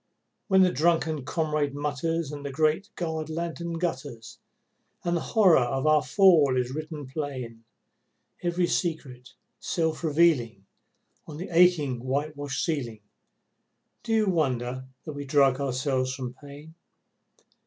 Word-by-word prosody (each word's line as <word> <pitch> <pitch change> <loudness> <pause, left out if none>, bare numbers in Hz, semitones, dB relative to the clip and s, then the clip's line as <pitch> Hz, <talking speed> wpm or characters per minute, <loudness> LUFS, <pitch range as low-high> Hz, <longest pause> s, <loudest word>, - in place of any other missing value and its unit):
When 190 -1 +5
the 180 - +3
drunken 160 -2 +1
comrade 150 -3 -1
mutters 150 +2 -2
and 145 -1 -7
the 140 - -4
great 155 +8 +1
guard 160 -3 -3
lantern 170 +1 -4
gutters 145 -9 -5 0.6
And 175 0 0
the 170 - -1
horror 190 - +4
of 130 +3 -1
our 155 -1 +5
fall 150 -4 +4
is 125 0 -1
written 155 -1 -6
plain, 130 -5 -6 0.8
Every 175 0 +1
secret, 140 -9 -3 0.2
self 160 -1 -2
revealing 145 - +2 0.6
on 150 -2 -8
the 180 +5 -6
aching 160 -8 +3
white 145 +4 -2
washed 145 -1 -3
ceiling, 120 -9 -3 1.0
Do 230 - -5
you 220 -1 +3
wonder 130 -7 -1 0.2
that 155 - -6
we 145 0 -6
drug 140 -1 +3
ourselves 130 -1 -1
from 125 -2 -5
pain? 145 +3 -13
150 Hz, 130 wpm, -26 LUFS, 130-165 Hz, 1.0 s, When